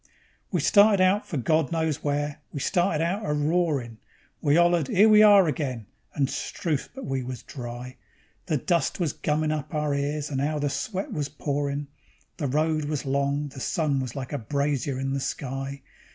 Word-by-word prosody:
We - - +1
started 205 -1 +5
out 185 +3 +3
for 155 - -3
God 155 +3 +1
Knows 160 -2 -1
Where, 145 0 -1
we 145 - -5
started 170 0 +1
out 190 +6 -1
a 150 - -1
roarin'; 150 -7 0 0.4
We 145 0 +3
'ollered: 175 -4 +3
"'Ere 205 +4 +5
We 215 -1 +7
Are 205 -3 +8
Again", 130 -7 -2 0.3
and 140 -2 +2
'struth! 150 +1 -3
but 270 - -7
we 135 -1 -1
was 125 0 -6
dry. 125 -1 -8 0.5
The 155 -4 +1
dust 170 +8 0
was 165 -5 0
gummin' 155 +1 0
up 150 0 -4
our 150 -1 0
ears, 145 +1 -2
and 135 -1 -1
'ow 150 +2 0
the 145 -1 -1
sweat 195 +3 -3
was 145 -2 -2
pourin'; 145 0 -2 0.5
The 145 - -1
road 155 +2 +1
was 150 -1 -3
long, 140 +2 0
the 135 - -10
sun 145 0 0
was 130 -3 -4
like 135 0 -5
a 145 - -1
brazier 140 +2 -1
in 135 0 -2
the 140 - -1
sky. 135 0 -4
145 Hz, 185 wpm, -26 LUFS, 135-160 Hz, 0.5 s, Are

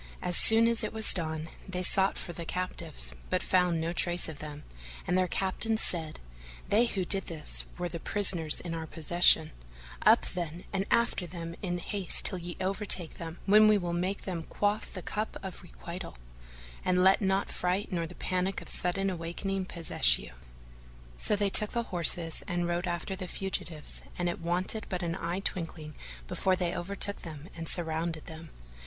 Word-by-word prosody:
As 180 - +1
soon 225 +4 +6
as 230 -1 +1
it - - -3
was 220 -1 +2
dawn, 160 -2 -2 0.2
they 180 -1 -3
sought 190 +2 +3
for 175 - -5
the 170 - -7
captives, 165 - -2 0.2
but - - 0
found 180 -3 +2
no 165 +1 -2
trace 175 0 0
of 155 -3 -8
them, 150 0 -8 0.4
and 180 - 0
their 185 0 +2
captains 210 +5 -1
said, 160 -3 -2 0.5
"They 230 +4 +4
who 195 -5 -2
did 195 +1 +5
this 160 -3 +1
were 175 0 -2
the 170 -1 -6
prisoners 175 -5 +2
in 170 -2 -5
our 160 -1 -5
possession; 160 0 +4 0.5
up, - - +5
then, 175 -1 -5
and 195 0 -1
after 235 -6 +1
them 170 -1 -7
in 175 -3 -2
all 175 - -6
haste 200 -3 +3
till 185 - +6
ye 175 0 -7
overtake 190 -3 0
them, 165 0 -6
when 210 +2 +6
we 215 -1 +5
will 175 -3 -3
make 185 +3 -2
them 180 -3 -4
quaff 205 +6 -2
the 185 - -8
cup 215 +1 -4
of 190 -1 -7
requital; 175 - -9 0.7
and 180 0 +2
let 190 +2 +5
not 195 0 0
fright 185 +4 -2
nor 170 -2 -2
the 175 - -12
panic 185 +1 -2
of - - -12
sudden 195 +2 +1
awaking 185 +2 -3
possess 160 - +2
you." - - -10 0.9
So - - +2
they 200 -1 0
took 210 +1 +6
horse 185 -10 +2 0.3
and 175 -1 -1
rode 175 +2 -2
after 175 +2 -3
the 185 -1 -6
fugitives 175 -5 -2 0.2
and 175 0 0
it 175 - -4
wanted 180 +6 -2
but 180 -1 -3
an 170 -1 -2
eye 180 +1 -3
twinkling 165 -5 -4 0.3
before 185 - +1
they 175 -1 -2
overtook 200 +3 -1
them; 155 0 -9
and 165 -1 -4
surrounded 165 -1 0
them. 160 -1 -10
180 Hz, 185 wpm, -29 LUFS, 165-195 Hz, 0.9 s, soon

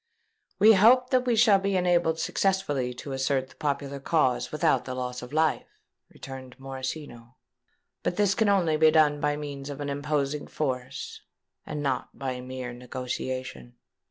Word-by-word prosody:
"We 215 +3 +7
hope 245 +6 +5
that 255 -1 +2
we 240 - +3
shall 215 -3 +5
be 195 0 -1
enabled 175 -2 +2
successfully 160 -9 0
to 135 +3 -8
assert 135 0 0
the - - -18
popular 140 -1 -2
cause 135 -3 +1
without 140 -4 +1
the 130 - -5
loss 125 -1 -4
of 125 +1 -9
life," 155 +1 +1 0.4
returned 130 -1 -10
Morosino. 130 -2 -7 0.7
"But 175 - -1
this 200 0 +3
can 215 +1 +2
only 175 -6 +3
be 155 0 +6
done 155 -2 +4
by 145 0 +1
means 145 -2 -6
of 140 -1 -6
an 145 -1 -3
imposing 145 0 -2
force, 130 -3 -4 0.5
and 150 -1 -4
not 130 -3 -2
by 130 -2 -4
mere 125 -1 -6
negotiation." 125 - -5
145 Hz, 155 wpm, -27 LUFS, 130-165 Hz, 0.7 s, We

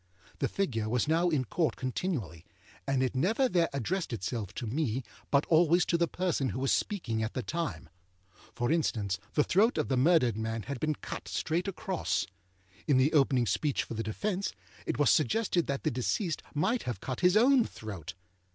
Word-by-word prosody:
The - - +1
figure 115 - -1
was 125 +4 +1
now 165 +3 +3
in 145 -6 +1
Court 160 +7 0
continually, 130 - -3 0.4
and 135 -1 +2
it 130 - 0
never 220 - +2
there 175 -7 +2
addressed 160 - -2
itself 110 -2 -3
to 120 - -4
me, 130 +1 -1 0.3
but 140 +1 +3
always 170 +1 +4
to - - +1
the 170 0 +2
person 170 -7 -1
who - - -4
was 135 0 +1
speaking 125 - -1
at 110 +1 -3
the 130 - -2
time. 155 - -3 0.7
For 120 +3 0
instance: 105 - 0 0.2
the 150 - +4
throat 210 +8 +3
of 155 - 0
the 130 - +1
murdered 130 - +4
man 110 0 -3
had 140 -2 -5
been 155 +2 0
cut - - -7
straight 170 +4 -1
across. 190 -1 -1 0.6
In 140 -4 +4
the 130 +4 +3
opening 135 -4 +3
speech 135 - 0
for - - -7
the 115 - -2
defence, 190 - -2 0.3
it - - -1
was - - +4
suggested 210 -6 +2
that 140 -1 -2
the - - +1
deceased 155 - -1
might 205 +11 +1
have 120 - -4
cut 130 +4 -4
his 180 +3 +4
own 255 +2 +5
throat. 95 - -7
140 Hz, 190 wpm, -30 LUFS, 120-175 Hz, 0.7 s, own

